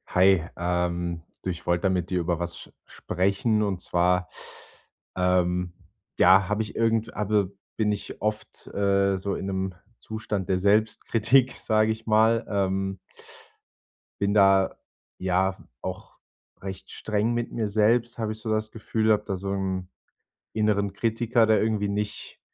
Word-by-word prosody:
Hi, 95 Hz, -1 st, +5 dB
ähm, 85 Hz, -1 st, -1 dB, 0.2 s
du 95 Hz, -, -4 dB
ich 85 Hz, -1 st, -5 dB
wollte 85 Hz, +1 st, +1 dB
da 95 Hz, -, +3 dB
mit 90 Hz, -2 st, -1 dB
dir 90 Hz, -, 0 dB
über 85 Hz, 0 st, -1 dB
was 85 Hz, 0 st, -3 dB
s -, -, -23 dB
sprechen, 100 Hz, +4 st, 0 dB
und 95 Hz, -3 st, -1 dB
zwar, 90 Hz, +1 st, +1 dB, 0.9 s
ähm, 90 Hz, -1 st, +1 dB, 0.5 s
ja, 95 Hz, +1 st, +6 dB
habe 105 Hz, +1 st, +1 dB
ich 105 Hz, -, -9 dB
irgend 115 Hz, -1 st, +1 dB
habe 105 Hz, -2 st, 0 dB, 0.3 s
bin 105 Hz, -2 st, +2 dB
ich 105 Hz, -, -5 dB
oft, 105 Hz, +1 st, -3 dB
äh, 100 Hz, -1 st, +2 dB
so 100 Hz, +1 st, -3 dB
in 95 Hz, -, -4 dB
’nem 95 Hz, -1 st, -2 dB, 0.2 s
Zustand 110 Hz, -3 st, -4 dB
der 95 Hz, -1 st, +2 dB
Selbstkritik, 110 Hz, +5 st, +3 dB
sage 110 Hz, 0 st, +1 dB
ich 110 Hz, +1 st, -5 dB
mal. 110 Hz, +1 st, +4 dB
Ähm 95 Hz, -1 st, -1 dB, 1.2 s
bin 100 Hz, 0 st, +1 dB
da, 95 Hz, -2 st, +4 dB, 0.4 s
ja, 95 Hz, +1 st, +1 dB, 0.2 s
auch -, -, -7 dB, 0.4 s
recht 95 Hz, -1 st, -7 dB
streng 110 Hz, +2 st, -1 dB
mit 120 Hz, 0 st, -2 dB
mir 110 Hz, -2 st, -1 dB
selbst, 115 Hz, +3 st, +2 dB
habe 110 Hz, -2 st, -2 dB
ich 110 Hz, -, -6 dB
so 110 Hz, -, -5 dB
das 110 Hz, 0 st, -1 dB
Gefühl, 110 Hz, 0 st, 0 dB
habe 105 Hz, -1 st, +2 dB
da 95 Hz, -, -2 dB
so 95 Hz, +1 st, -4 dB
'n 95 Hz, -2 st, -3 dB, 0.6 s
inneren 100 Hz, -2 st, +1 dB
Kritiker, 115 Hz, +2 st, +2 dB
der 110 Hz, -1 st, +3 dB
irgendwie 105 Hz, -2 st, 0 dB
nicht 105 Hz, +1 st, -4 dB
100 Hz, 150 wpm, -26 LUFS, 95-110 Hz, 1.2 s, ja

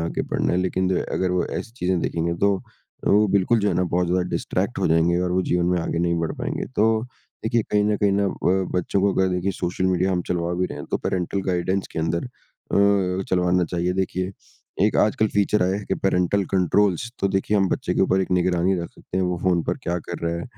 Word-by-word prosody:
आगे 85 Hz, 0 st, -2 dB
बढ़ना -, -, -1 dB
है 90 Hz, -, +2 dB
लेकिन 95 Hz, 0 st, 0 dB
जो 95 Hz, -, +1 dB
है -, -, 0 dB
अगर 95 Hz, -1 st, 0 dB
वो 90 Hz, -1 st, +1 dB
ऐसी 115 Hz, -, -8 dB
चीज़ें 90 Hz, -5 st, 0 dB
देखेंगे 85 Hz, +1 st, -1 dB
तो 100 Hz, 0 st, +4 dB, 0.5 s
वो 105 Hz, +1 st, +5 dB
बिल्कुल 100 Hz, +4 st, +3 dB
जो 105 Hz, -1 st, +1 dB
है -, -, 0 dB
ना 90 Hz, -, +2 dB
बहुत 90 Hz, +1 st, 0 dB
ज़्यादा 90 Hz, +1 st, +1 dB
डिस्टरैक्ट -, -, -2 dB
हो -, -, +1 dB
जाएँगे 80 Hz, +2 st, +3 dB
और 90 Hz, 0 st, -1 dB
वो 95 Hz, +1 st, +2 dB
जीवन 90 Hz, -1 st, 0 dB
में 90 Hz, 0 st, +2 dB
आगे 85 Hz, -, -2 dB
नहीं 85 Hz, 0 st, +1 dB
बढ़ 85 Hz, -, -1 dB
पाएँगे। -, -, -3 dB
तो 110 Hz, +1 st, +3 dB, 0.4 s
देखिए 115 Hz, 0 st, +2 dB
कहीं 105 Hz, 0 st, +3 dB
न 105 Hz, 0 st, +2 dB
कहीं 100 Hz, -1 st, +2 dB
न 100 Hz, +1 st, +2 dB
अ, 95 Hz, +1 st, 0 dB
बच्चों 95 Hz, +2 st, 0 dB
को 100 Hz, 0 st, +2 dB
अगर 95 Hz, 0 st, +2 dB
देखिए 90 Hz, +1 st, -1 dB
सोशल 90 Hz, 0 st, -2 dB
मीडिया 95 Hz, +1 st, +1 dB
हम 90 Hz, -1 st, 0 dB
चलवा 85 Hz, -1 st, -1 dB
भी 90 Hz, +1 st, 0 dB
रहे -, -, -7 dB
हैं। -, -, -7 dB
तो -, -, +2 dB
पेरेंटल 95 Hz, +1 st, -2 dB
गाइडेंस 95 Hz, +1 st, 0 dB
के -, -, -4 dB
अंदर 85 Hz, +4 st, -1 dB
अ, 100 Hz, -6 st, 0 dB
चलवाना 90 Hz, 0 st, +2 dB
चाहिए। 90 Hz, +1 st, -1 dB
देखिए 95 Hz, 0 st, -2 dB, 0.5 s
एक 105 Hz, -, +2 dB
आजकल 110 Hz, +1 st, +3 dB
फीचर 105 Hz, -1 st, +2 dB
आया 95 Hz, +1 st, +1 dB
है 105 Hz, -, -7 dB
कि -, -, -1 dB
पेरेंटल 95 Hz, +1 st, +2 dB
कंट्रोल्स। 95 Hz, +4 st, +2 dB
तो 100 Hz, -, +2 dB
देखिए 95 Hz, +2 st, 0 dB
हम 95 Hz, -2 st, +2 dB
बच्चे -, -, -1 dB
के -, -, +1 dB
ऊपर 95 Hz, -, +3 dB
एक 95 Hz, -, -2 dB
निगरानी 90 Hz, +1 st, +2 dB
रख 85 Hz, -, -4 dB
सकते 95 Hz, -, -9 dB
हैं 95 Hz, -, +1 dB
वो 90 Hz, -1 st, -1 dB
फ़ोन 90 Hz, -3 st, +2 dB
पर -, -, -1 dB
क्या 85 Hz, +1 st, -1 dB
कर 85 Hz, -, -4 dB
रहा 85 Hz, -, -1 dB
है? 85 Hz, -, -5 dB
90 Hz, 240 wpm, -23 LUFS, 90-100 Hz, 0.5 s, वो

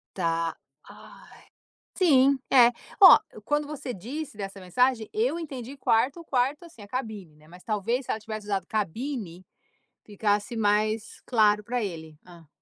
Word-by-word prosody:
Tá, 165 Hz, -2 st, -1 dB, 0.3 s
ai. -, -, -16 dB, 0.5 s
Sim, 275 Hz, -7 st, +4 dB
é. 245 Hz, -2 st, +7 dB, 0.3 s
Olha, 375 Hz, -, +11 dB, 0.2 s
quando 295 Hz, +2 st, -1 dB
você 275 Hz, -4 st, -6 dB
disse 250 Hz, -, -7 dB
dessa 195 Hz, -1 st, -7 dB
mensagem, 225 Hz, +5 st, +1 dB
eu 435 Hz, -5 st, 0 dB
entendi 275 Hz, -5 st, -7 dB
quarto 265 Hz, +6 st, +1 dB
quarto, 275 Hz, +2 st, 0 dB
assim, 325 Hz, -10 st, -14 dB
a 205 Hz, -, -11 dB
cabine, 210 Hz, -, -6 dB
né. 150 Hz, 0 st, -21 dB
Mas 180 Hz, +1 st, -14 dB
talvez 230 Hz, +4 st, -2 dB
se -, -, -3 dB
ela 220 Hz, -, -3 dB
tivesse 215 Hz, -2 st, -7 dB
usado 195 Hz, -3 st, -1 dB
cabine, 210 Hz, -, -4 dB, 0.6 s
ficasse 210 Hz, +2 st, -1 dB
mais 215 Hz, +1 st, 0 dB
claro 210 Hz, -3 st, +3 dB
para 240 Hz, +1 st, -2 dB
ele. 160 Hz, -5 st, -7 dB
Hã. 170 Hz, -3 st, -16 dB
220 Hz, 145 wpm, -26 LUFS, 195-265 Hz, 0.6 s, Olha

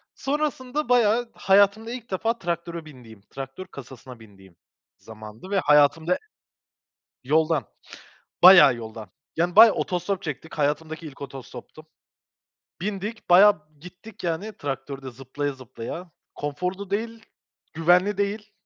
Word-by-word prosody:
Sonrasında 285 Hz, -1 st, -2 dB
bayağı 240 Hz, 0 st, +3 dB
hayatımda 200 Hz, +4 st, +3 dB
ilk 245 Hz, -3 st, -8 dB
defa 225 Hz, +5 st, -1 dB
traktöre 170 Hz, -1 st, -4 dB
bindiğim, 120 Hz, -8 st, -14 dB
traktör 135 Hz, +6 st, -8 dB
kasasına 130 Hz, -2 st, -12 dB
bindiğim 95 Hz, -5 st, -18 dB, 0.4 s
zamandı 110 Hz, -, -12 dB
ve 200 Hz, -1 st, +1 dB
hayatımda 150 Hz, +4 st, +3 dB, 1.1 s
yoldan, 155 Hz, -1 st, +1 dB, 0.8 s
bayağı 180 Hz, -8 st, +9 dB
yoldan 110 Hz, -1 st, -9 dB, 0.3 s
yani 175 Hz, +3 st, 0 dB
bayağı 225 Hz, -1 st, +9 dB
otostop 185 Hz, +2 st, -2 dB
çektik. 160 Hz, 0 st, -6 dB
Hayatımdaki 155 Hz, +2 st, -2 dB
ilk 140 Hz, -1 st, -11 dB
otostoptu. 135 Hz, +2 st, -10 dB, 1.0 s
Bindik 210 Hz, +3 st, -5 dB
bayağı 190 Hz, -1 st, +6 dB, 0.2 s
gittik 180 Hz, +6 st, -13 dB
yani 175 Hz, +6 st, -3 dB
traktörde 135 Hz, -1 st, -6 dB
zıplaya 135 Hz, +3 st, -5 dB
zıplaya. 130 Hz, +7 st, -9 dB, 0.2 s
Konforlu 180 Hz, +7 st, -4 dB
değil, 225 Hz, +2 st, -4 dB, 0.5 s
güvenli 180 Hz, +5 st, +3 dB
değil 205 Hz, +1 st, -3 dB
170 Hz, 110 wpm, -24 LUFS, 135-200 Hz, 1.1 s, bayağı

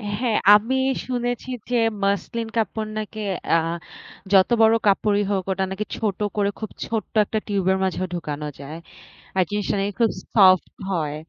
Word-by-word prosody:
হ্যাঁ, 230 Hz, 0 st, 0 dB, 0.2 s
আমি 225 Hz, +5 st, +1 dB, 0.3 s
শুনেছি 245 Hz, 0 st, -2 dB, 0.2 s
যে, 245 Hz, -, 0 dB, 0.3 s
মাসলিন 210 Hz, +3 st, -1 dB
কাপড় 220 Hz, 0 st, -1 dB
নাকি 215 Hz, 0 st, -5 dB, 0.3 s
আ -, -, +6 dB, 0.8 s
যত 190 Hz, -1 st, +6 dB
বড় 225 Hz, 0 st, +6 dB
কাপড়ই 205 Hz, +1 st, +3 dB
হোক 195 Hz, -2 st, 0 dB
ওটা 190 Hz, 0 st, 0 dB
নাকি 210 Hz, +2 st, -3 dB
ছোট 210 Hz, -4 st, -2 dB, 0.2 s
করে 200 Hz, -1 st, +1 dB
খুব 220 Hz, -, -5 dB, 0.2 s
ছোট্ট 225 Hz, -2 st, -4 dB
১ -, -, -10 dB
টা 220 Hz, -, +2 dB
টিউবের 190 Hz, -2 st, +1 dB
মাঝেও 185 Hz, 0 st, -1 dB
ঢুকানো 150 Hz, -3 st, -4 dB
যায়। 145 Hz, +3 st, -8 dB, 0.6 s
আর 185 Hz, -, +4 dB
জিনিসটা 205 Hz, 0 st, -1 dB
নাকি 200 Hz, +1 st, -1 dB
খুব 230 Hz, -2 st, +4 dB, 0.2 s
সফট 185 Hz, -5 st, +5 dB, 0.2 s
হয়। 155 Hz, -5 st, -1 dB
205 Hz, 160 wpm, -23 LUFS, 190-220 Hz, 0.8 s, আ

